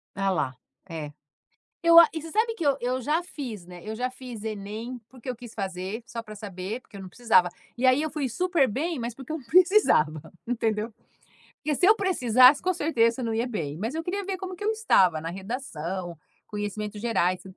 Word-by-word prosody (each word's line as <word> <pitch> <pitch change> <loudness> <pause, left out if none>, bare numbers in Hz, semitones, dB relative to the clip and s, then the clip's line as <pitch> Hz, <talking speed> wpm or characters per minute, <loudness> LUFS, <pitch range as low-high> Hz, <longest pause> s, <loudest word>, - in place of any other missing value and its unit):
A 195 0 0
lá, 150 -8 -1 0.3
é. 155 -3 -5 0.7
Eu 335 0 +9
a 335 - +9
e 320 - -4
você 325 +1 -9
sabe 450 +4 +1
que 335 - -4
eu 280 -1 +3
eu 250 +1 -1
já 300 +7 +1
fiz, 240 - -7
né, 180 0 -11
eu 215 - -5
já 250 +3 -1
fiz 250 -4 -9
Enem, 220 +3 -5
porque 255 -1 -10
eu 250 - -2
quis 240 -1 -11
fazer, 190 +1 -4
só 235 -1 -6
para 215 -1 -10
saber, 200 +2 -5
porque 225 - -18
eu - - -8
não 190 - -9
precisava. 200 -5 +3 0.3
E 250 - 0
aí 255 +2 +5
eu 315 - -1
fui 295 -3 -2
super 335 - +2
bem, 300 +6 -2
mas 235 0 -3
porque 265 +3 -9
eu 320 - -1
não 275 - -12
precisava, 340 - +4 0.2
entendeu. 225 -2 -1 0.7
Porque 300 0 -2
se 360 - 0
eu 425 - +8
precisasse, 255 - +5
com 370 - +2
certeza 235 -7 +2
eu 245 - -2
não 225 - -1
ia 230 +2 0
bem. 160 - -4
Mas 225 - -3
eu 325 - -2
queria 385 +4 -3
ver 385 0 -3
como 375 -1 -6
que 410 - -7
eu 430 - +2
estava 190 - +3
na 165 - -5
redação, 185 - -5 0.3
conhecimentos 210 0 -4
gerais, 185 -6 +1
235 Hz, 215 wpm, -26 LUFS, 195-300 Hz, 0.7 s, Eu